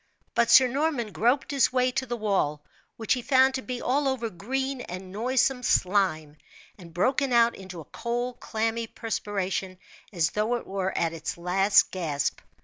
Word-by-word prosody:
But 235 - +2
Sir 260 - +8
Norman 270 -4 -1
groped 245 +8 +1
his 275 -3 +3
way 255 0 +2
to 260 +1 -2
the 240 0 -3
wall, 190 -9 0 0.3
which 225 -2 +1
he 250 - -2
found 265 0 +4
to 260 - -2
be 250 -1 -5
all 280 +2 +1
over 240 -4 -2
green 265 +7 -3
and 185 -2 -8
noisome 250 +4 +1
slime, 180 -9 +1 0.4
and 175 -4 -13
broken 260 +10 +1
out 235 -1 +4
into 185 -3 -9
a - - -13
cold, 240 +1 -4
clammy 225 +1 -2
perspiration, 195 -4 -3 0.3
as 170 -6 +1
though 215 +3 0
it 240 - -5
were 190 -1 -2
at 165 -1 0
its 165 0 -5
last 190 +4 +3
gasp. 160 -6 -2
225 Hz, 170 wpm, -26 LUFS, 185-255 Hz, 0.4 s, Sir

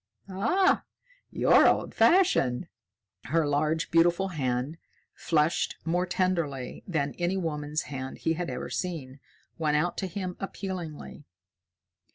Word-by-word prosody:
"Ah, 235 - +2 0.5
you're - - +5
old - - +1
fashioned!" 340 - +3 0.6
Her 160 +4 +1
large, 155 +3 0
beautiful 175 +3 +3
hand, 135 -1 -2 0.3
fleshed 155 0 +1
more 175 +2 0
tenderly 170 -9 -1
than 145 -6 -1
any 175 +2 0
woman's 150 -3 -2
hand 130 -2 -6
he 160 - 0
had 170 +1 -3
ever - - -5
seen, 145 -7 -4 0.4
went 150 -2 +2
out 175 +4 0
to 190 - -2
him 185 -1 -5
appealingly. 180 -7 -6
165 Hz, 120 wpm, -28 LUFS, 145-185 Hz, 0.6 s, you're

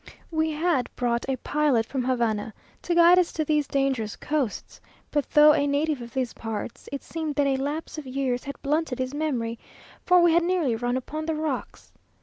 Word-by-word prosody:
We 315 0 +1
had 310 -3 0
brought 240 +1 -1
a 265 - +1
pilot 285 -4 +1
from 260 +2 -3
Havana 230 -4 -1 0.3
to 345 - -1
guide 345 +1 +7
us 355 - +1
to 315 - -1
these 300 -1 +1
dangerous 265 -6 0
coasts, 290 -8 -3 0.3
but 290 -2 0
though 300 0 +7
a 285 -1 +1
native 290 -1 0
of 235 0 -8
these 255 -3 -1
parts, 225 +2 -6
it 280 - -5
seemed 315 -3 -4
that 285 - +2
a 270 -1 +1
lapse 295 +4 -4
of 290 - -9
years 255 -1 -2
had 280 - -7
blunted 295 -2 0
his 255 +1 -3
memory, 250 -7 -2 0.4
for 360 0 +5
we 345 -1 +5
had 340 - +5
nearly 340 -8 +1
run 245 +2 -1
upon 310 +5 -5
the 320 - 0
rocks. 305 -4 -4
280 Hz, 195 wpm, -25 LUFS, 250-310 Hz, 0.4 s, guide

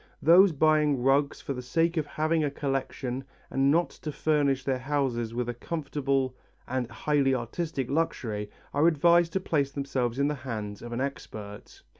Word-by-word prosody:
Those 180 +5 +7
buying 150 -3 +3
rugs 140 +2 +2
for 140 - -3
the 125 - -5
sake 165 +7 +1
of 155 -3 -1
having 155 +1 0
a 145 - +1
collection 135 -2 -3 0.3
and 135 +1 +2
not 170 +4 +2
to 150 - -6
furnish 145 -3 +1
their 130 -2 0
houses 125 -4 -1
with 125 0 -1
a 120 - -2
comfortable 135 -2 -2 0.3
and 125 -1 -2
highly 140 -3 +1
artistic 130 +2 -3
luxury 115 -9 -1 0.2
are 145 +3 +4
advised 170 +1 +4
to 190 - +1
place 145 -7 0
themselves 135 -4 -2
in 140 +1 +2
the 150 - 0
hands 110 -7 -5
of 120 - -8
an 120 +2 -2
expert. 105 -7 -7
140 Hz, 170 wpm, -28 LUFS, 125-155 Hz, 0.3 s, Those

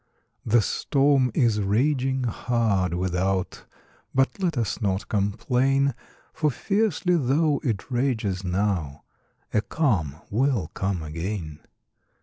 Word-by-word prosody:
The 115 0 +3
storm 135 0 +2
is 115 -5 +2
raging 130 +5 +1
hard, 110 -7 0
without; 95 +1 -1 0.5
But 135 +8 +2
let 170 -6 0
us 115 -2 -1
not 95 -2 -1
complain, 125 +7 +1 0.4
For 155 - +1
fiercely 195 - +1
tho' 145 +2 +2
it 115 -2 -2
rages 115 -7 0
now, 90 -6 -1 0.5
A 105 - +3
calm 105 - 0 0.2
will 115 - +1
come 95 -3 -2
again. 80 0 -5
115 Hz, 110 wpm, -25 LUFS, 95-135 Hz, 0.5 s, The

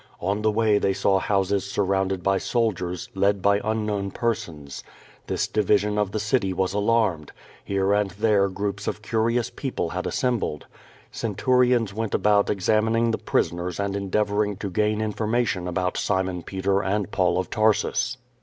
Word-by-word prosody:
On 100 +4 -1
the 110 - +2
way 110 -1 +2
they 95 - +1
saw 95 0 +2
houses 100 0 0
suiTOunded 95 -2 -1
by 95 0 +2
soldiers, 90 -8 -1
led 100 +1 +2
by 100 +2 +2
unknown 105 -2 -1
persons. 85 - -4 0.4
This - - -1
divis 105 -1 +2
ion 105 0 -1
of 105 -2 +1
the 110 - -2
city 105 -2 0
was 95 +1 -1
alarmed. 105 -7 +1 0.3
Here 100 0 +1
and 105 -1 +1
there 100 0 +2
groups 100 +1 -4
of 105 - -3
cur 110 +1 +1
ious 120 0 0
people 130 - -3
had 90 +2 -3
assembled. 120 - -1 0.5
Centurions 120 0 +1
went 110 0 -2
about 105 -1 +3
examin 110 +3 +1
ing 115 0 +2
the - - -2
prisoners 85 +1 -1
and 100 -1 -1
endeavoring 105 +1 0
to 100 0 -5
gain 105 +2 +1
information 110 -3 -1
about 90 +1 -1
Simon 95 -3 -1
Peter 95 +2 -1
and 100 +1 -1
Paul 90 -2 +2
of 95 - -2
Tarsus. 110 -1 +1
100 Hz, 165 wpm, -24 LUFS, 95-110 Hz, 0.5 s, about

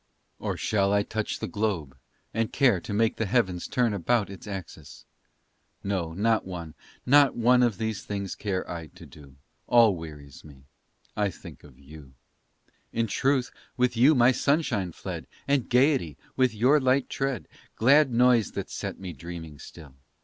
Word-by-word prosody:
Or - - -3
shall 100 -2 +1
I 100 0 +3
touch 110 +1 -3
the - - -4
globe, 95 -11 -2 0.4
and 115 0 -1
care 120 -11 +3
To - - -8
make 110 +2 +1
the 110 - -1
heavens 95 -5 0
turn 120 -4 +1
upon 100 +2 0
Its 95 +2 -11
axis? 85 -7 -9 0.8
No, 90 -5 -2
not 110 +5 +1
one 85 -4 -7 0.3
not 140 +1 +5
one 125 +1 +4
Of 120 -2 +3
all - - -21
these 110 -2 -3
things 100 -2 -4
care 95 -3 -3
I 85 -2 -6
to - - -15
do; 70 -3 -15 0.3
All 115 -5 +5
wearies 75 -5 -10
me 70 -3 -15 0.5
I 105 -1 +1
think - - -12
of 70 -4 -16
you. 70 0 -14 0.8
In 115 - 0
truth 130 +4 0 0.3
with 125 -1 +1
you 135 +7 +5
my 125 0 +5
sunshine 130 - 0
fled, - - -7 0.2
And 140 -3 +1
gayety 125 - +2 0.2
with 130 -1 +3
your 130 +8 +4
light 130 0 +2
tread 135 -2 -3 0.3
Glad 140 +4 +4
noise 120 -2 +3
that - - -5
set - - -5
me 95 -2 -7
dreaming 80 0 -9
still. 75 -5 -12
105 Hz, 165 wpm, -26 LUFS, 85-125 Hz, 0.8 s, not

